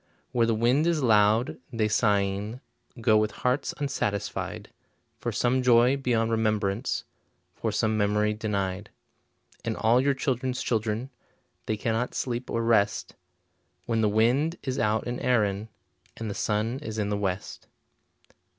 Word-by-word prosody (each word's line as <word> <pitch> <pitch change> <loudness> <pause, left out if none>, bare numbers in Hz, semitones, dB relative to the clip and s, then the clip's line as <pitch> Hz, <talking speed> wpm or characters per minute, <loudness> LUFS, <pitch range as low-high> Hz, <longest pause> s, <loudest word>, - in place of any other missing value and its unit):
Where 115 -2 +2
the 115 - +2
wind 125 +8 +2
is 165 -4 +1
loud, 110 +1 +3
they 115 -3 +1
sighing 105 +1 +1 0.4
Go 110 -1 +4
with 110 0 +2 0.2
hearts 130 +3 +1
unsatisfied, 120 -8 -3 0.5
For - - -2
some 125 +2 +1
joy 125 +1 +5
beyond 120 -4 0
remembrance, 110 0 0 0.5
For - - -2
some 110 -1 +1
memory 105 +1 +2
denied. 100 -2 -3 0.7
And - - -2
all 115 +3 +4
your 140 0 +2
children's 130 -1 -1
children, 115 +3 -1 0.6
They 110 - 0
cannot 115 +3 -1
sleep 125 0 -3
or 115 - -1
rest, 110 -3 +2 0.7
When 115 -2 0
the 105 - +3
wind 125 +10 +2
is 130 -2 -2
out 110 +1 +1
in 120 0 -3
Erinn 105 -4 +1 0.5
And 110 -2 -4
the - - -3
sun 110 +5 -1
is 110 -7 -6
in 105 -1 -1
the 105 - 0
west. 95 -2 -4
115 Hz, 140 wpm, -27 LUFS, 105-125 Hz, 0.7 s, joy